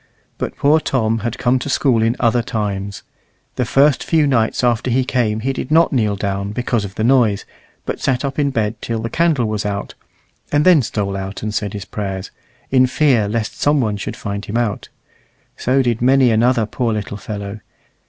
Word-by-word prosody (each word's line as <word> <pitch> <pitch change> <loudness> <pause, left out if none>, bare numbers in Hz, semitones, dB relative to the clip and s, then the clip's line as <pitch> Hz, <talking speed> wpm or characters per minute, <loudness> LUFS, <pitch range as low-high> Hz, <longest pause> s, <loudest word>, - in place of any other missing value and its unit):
But - - -4
poor 150 +3 +4
Tom 115 -6 0
had 115 +1 -3
come 125 +1 +2
to 135 - -5
school 130 -4 +2
in 115 +2 +2
other 120 0 +2
times. 100 -4 -4 0.5
The 125 - 0
first 140 +4 +3
few 160 -3 +2
nights 125 -4 +1
after 120 0 +1
he 130 +1 +1
came 110 -4 0
he 135 +3 -1
did 130 - -5
not 165 +1 +4
kneel 110 -5 +1
down 100 0 -3
because 120 -1 -1
of 100 -1 -7
the 110 - -2
noise, 115 -5 +3 0.4
but - - -3
sat 130 +1 0
up 140 +1 -3
in 145 -1 +2
bed 110 -4 -2
till 115 -1 -3
the 115 - -4
candle 160 -7 +2
was 110 -1 -2
out, 100 -1 -4 0.6
and 145 +1 +2
then 180 -5 +6
stole 100 -4 -2
out 95 +1 -5
and 105 -1 -3
said 105 -2 -2
his 100 -2 -6
prayers, 95 -1 -5 0.4
in 130 -1 +5
fear 125 -6 +2
lest 110 +1 -3
some 145 0 +3
one 110 -5 0
should 105 +2 -5
find 100 -2 -5
him 105 - -3
out. 115 -4 -2 0.7
So 130 +2 +1
did 120 -2 0
many 130 0 +4
another 115 +1 +3
poor 115 +2 -2
little 105 -1 -4
fellow. 100 0 -6
115 Hz, 200 wpm, -18 LUFS, 105-130 Hz, 0.7 s, then